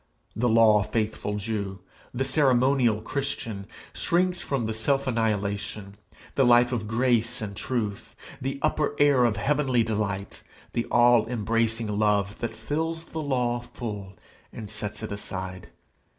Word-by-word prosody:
The 120 Hz, +4 st, +1 dB
law 110 Hz, -2 st, +6 dB
faithful 105 Hz, 0 st, -2 dB
Jew, 100 Hz, -2 st, -3 dB, 0.3 s
the 130 Hz, +2 st, -1 dB
ceremonial 130 Hz, -4 st, +3 dB
Christian, 115 Hz, -7 st, -4 dB, 0.3 s
shrinks 180 Hz, +1 st, +1 dB
from 135 Hz, -5 st, -1 dB
the 110 Hz, -, -2 dB
self 135 Hz, +5 st, +1 dB
annihilation, 105 Hz, -3 st, -2 dB, 0.4 s
the 135 Hz, -, +3 dB
Life 120 Hz, 0 st, +5 dB
of 110 Hz, -4 st, -2 dB
grace 120 Hz, +1 st, +1 dB
and 100 Hz, -2 st, -5 dB
truth, 105 Hz, -3 st, -3 dB, 0.3 s
the 135 Hz, +1 st, -2 dB
upper 150 Hz, -1 st, +1 dB
air 140 Hz, -4 st, +5 dB
of 110 Hz, -4 st, +1 dB
heavenly 130 Hz, 0 st, +2 dB
delight, 100 Hz, -3 st, -3 dB, 0.3 s
the 120 Hz, -, -1 dB
all 120 Hz, -2 st, +4 dB
embracing 115 Hz, -2 st, 0 dB
love 105 Hz, -1 st, +1 dB
that 115 Hz, -, -2 dB
fills 160 Hz, +7 st, -2 dB
the 160 Hz, -, -5 dB
law 125 Hz, -4 st, 0 dB
full 105 Hz, -5 st, -7 dB, 0.4 s
and 110 Hz, -3 st, -8 dB
sets 110 Hz, 0 st, -5 dB
it 110 Hz, -, -5 dB
aside. 95 Hz, -2 st, -5 dB
115 Hz, 135 wpm, -26 LUFS, 105-130 Hz, 0.4 s, law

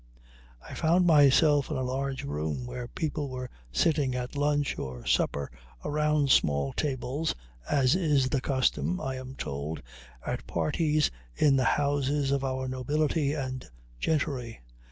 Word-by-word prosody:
I -, -, -8 dB
found 175 Hz, +3 st, +3 dB
myself 145 Hz, -2 st, +5 dB
in 155 Hz, -, -2 dB
a 130 Hz, -, -1 dB
large 135 Hz, +1 st, -2 dB
room, 75 Hz, -, -3 dB
where 125 Hz, 0 st, -5 dB
people 150 Hz, 0 st, -3 dB
were 125 Hz, -1 st, -6 dB, 0.2 s
sitting 140 Hz, -, +2 dB
at 125 Hz, +1 st, -4 dB
lunch 145 Hz, 0 st, 0 dB
or 60 Hz, -2 st, -6 dB
supper 70 Hz, +1 st, 0 dB, 0.3 s
around 150 Hz, -2 st, +2 dB
small 70 Hz, -, +3 dB
tables, 140 Hz, +2 st, -2 dB, 0.3 s
as 135 Hz, -2 st, +3 dB
is 150 Hz, -7 st, +2 dB
the 135 Hz, -2 st, 0 dB
custom, 140 Hz, +7 st, 0 dB
I 130 Hz, -1 st, -3 dB
am 130 Hz, 0 st, -8 dB
told, 70 Hz, -, -4 dB, 0.4 s
at -, -, -4 dB
parties 155 Hz, -1 st, +1 dB, 0.2 s
in 145 Hz, -3 st, +4 dB
the 130 Hz, -2 st, +2 dB
houses 145 Hz, -1 st, +1 dB
of 140 Hz, -1 st, +1 dB
our 130 Hz, -1 st, -2 dB
nobility 145 Hz, +3 st, 0 dB
and 130 Hz, -3 st, -4 dB, 0.4 s
gentry. 130 Hz, -, -1 dB
135 Hz, 140 wpm, -28 LUFS, 125-150 Hz, 0.4 s, myself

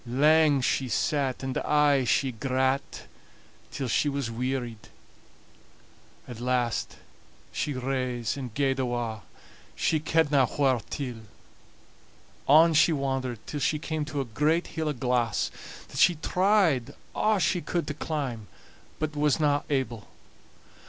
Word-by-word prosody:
Lang 145 Hz, +3 st, +4 dB
she 130 Hz, 0 st, 0 dB
sat, 135 Hz, 0 st, 0 dB
and 130 Hz, -1 st, -3 dB
aye 145 Hz, -3 st, +3 dB
she 130 Hz, +2 st, +2 dB
grat, 130 Hz, +3 st, -1 dB, 0.7 s
till 135 Hz, -2 st, -4 dB
she 145 Hz, +5 st, +1 dB
wearied. 125 Hz, -3 st, -3 dB, 1.4 s
At 120 Hz, -3 st, -8 dB
last 125 Hz, -1 st, -1 dB, 0.6 s
she 150 Hz, -, -2 dB
rase 125 Hz, -3 st, -2 dB
and 130 Hz, -4 st, -6 dB
gaed 135 Hz, +2 st, 0 dB
awa', 120 Hz, -4 st, -2 dB, 0.5 s
she 160 Hz, -, +1 dB
kedna 150 Hz, -4 st, +2 dB
whaur 135 Hz, -5 st, +2 dB
till. 125 Hz, -5 st, -5 dB, 1.3 s
On 160 Hz, +4 st, +6 dB
she 160 Hz, +2 st, +5 dB
wandered 135 Hz, -5 st, -2 dB
till 150 Hz, -, -5 dB
she 150 Hz, -, +1 dB
came 155 Hz, 0 st, -3 dB
to 150 Hz, -1 st, -4 dB
a 135 Hz, -, -1 dB
great 150 Hz, +9 st, +1 dB
hill 160 Hz, -1 st, -1 dB
o' -, -, -1 dB
glass, 125 Hz, -2 st, 0 dB, 0.4 s
that -, -, -6 dB
she 175 Hz, -, +5 dB
tried 180 Hz, -, +1 dB, 0.2 s
a' 215 Hz, -1 st, +2 dB
she 180 Hz, 0 st, +1 dB
could 175 Hz, 0 st, -2 dB
to 150 Hz, -, -4 dB
climb, 135 Hz, -8 st, -4 dB, 0.5 s
bat 155 Hz, 0 st, -3 dB
wasna 145 Hz, 0 st, +2 dB
able. 120 Hz, -6 st, -2 dB
135 Hz, 125 wpm, -27 LUFS, 125-150 Hz, 1.4 s, On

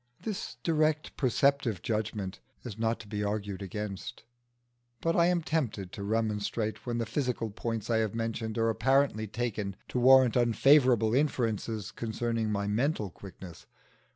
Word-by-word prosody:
This 215 Hz, -4 st, -5 dB
direct 155 Hz, -1 st, +1 dB
perceptive 130 Hz, -, +1 dB
judgment 105 Hz, -3 st, -2 dB, 0.2 s
is 115 Hz, -3 st, -7 dB
not 115 Hz, 0 st, 0 dB
to 105 Hz, -, -13 dB
be 105 Hz, 0 st, -3 dB
argued 100 Hz, -1 st, -3 dB
against. 100 Hz, 0 st, -6 dB, 0.8 s
But 165 Hz, 0 st, 0 dB
I 170 Hz, -1 st, +5 dB
am 175 Hz, -2 st, +1 dB
tempted 115 Hz, -, -2 dB
to -, -, -7 dB
remonstrate 110 Hz, +1 st, -1 dB
when 120 Hz, -1 st, -1 dB
the 115 Hz, -, -1 dB
physical 125 Hz, -6 st, -2 dB
points 115 Hz, 0 st, -4 dB
I 115 Hz, -, +2 dB
have 110 Hz, -1 st, 0 dB
mentioned 115 Hz, -1 st, -3 dB
are 115 Hz, 0 st, +2 dB
apparently 135 Hz, -3 st, +2 dB
taken 105 Hz, -3 st, -3 dB
to 125 Hz, -, -1 dB
warrant 130 Hz, -1 st, +6 dB
unfavourable 120 Hz, -1 st, +4 dB
inferences 115 Hz, -6 st, 0 dB
concerning 115 Hz, -1 st, -2 dB
my 100 Hz, -1 st, -1 dB
mental 105 Hz, -, 0 dB
quickness. 95 Hz, -2 st, -11 dB
115 Hz, 145 wpm, -30 LUFS, 105-130 Hz, 0.8 s, warrant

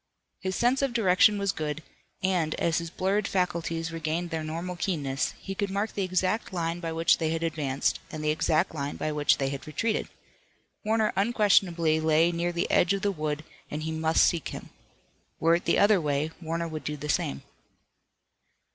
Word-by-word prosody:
His 190 Hz, 0 st, -3 dB
sense 250 Hz, +3 st, +2 dB
of 275 Hz, -3 st, 0 dB
direction 205 Hz, -1 st, +4 dB
was 200 Hz, -1 st, +1 dB
good, 155 Hz, -1 st, -4 dB, 0.4 s
and, 175 Hz, -5 st, +1 dB
as 165 Hz, -1 st, +1 dB
his 170 Hz, 0 st, -5 dB
blurred 195 Hz, +4 st, 0 dB
faculties 170 Hz, -3 st, -1 dB
regained 165 Hz, +2 st, -2 dB
their 160 Hz, -1 st, -2 dB
normal 170 Hz, +3 st, -4 dB
keenness, 145 Hz, -7 st, -1 dB
he 195 Hz, -, -5 dB
could 200 Hz, +1 st, -2 dB
mark 200 Hz, +3 st, -2 dB
the 200 Hz, -, -2 dB
exact 185 Hz, +4 st, 0 dB
line 170 Hz, -1 st, -2 dB
by 165 Hz, -2 st, -4 dB
which 165 Hz, +1 st, +3 dB
they 160 Hz, -2 st, 0 dB
had 165 Hz, +1 st, -1 dB
advanced, 150 Hz, -5 st, 0 dB
and 155 Hz, -1 st, -5 dB
the 150 Hz, -, +2 dB
exact 155 Hz, +3 st, +1 dB
line 140 Hz, -2 st, -3 dB
by 155 Hz, -, -2 dB
which 150 Hz, -1 st, +3 dB
they 135 Hz, -1 st, 0 dB
had 140 Hz, +1 st, -6 dB
retreated. 215 Hz, +9 st, -1 dB, 0.8 s
Warner 220 Hz, 0 st, +1 dB
unquestionably 195 Hz, -7 st, +3 dB
lay 160 Hz, +2 st, +3 dB
near 170 Hz, +1 st, -1 dB
the 170 Hz, 0 st, -2 dB
edge 180 Hz, +2 st, +4 dB
of 195 Hz, +1 st, -3 dB
the 205 Hz, -, +2 dB
wood 155 Hz, -3 st, -3 dB, 0.3 s
and 150 Hz, +1 st, -4 dB
he 160 Hz, -, -2 dB
must 160 Hz, 0 st, +3 dB
seek 170 Hz, -3 st, 0 dB
him. -, -, -8 dB, 0.7 s
Were 165 Hz, +1 st, +4 dB
it 170 Hz, -, 0 dB
the -, -, +3 dB
other 205 Hz, -2 st, +5 dB
way, 150 Hz, +1 st, 0 dB
Warner 165 Hz, +1 st, -2 dB
would 155 Hz, -1 st, -6 dB
do 150 Hz, 0 st, -3 dB
the 150 Hz, +1 st, -6 dB
same. 70 Hz, -, -1 dB
165 Hz, 190 wpm, -27 LUFS, 155-190 Hz, 0.8 s, other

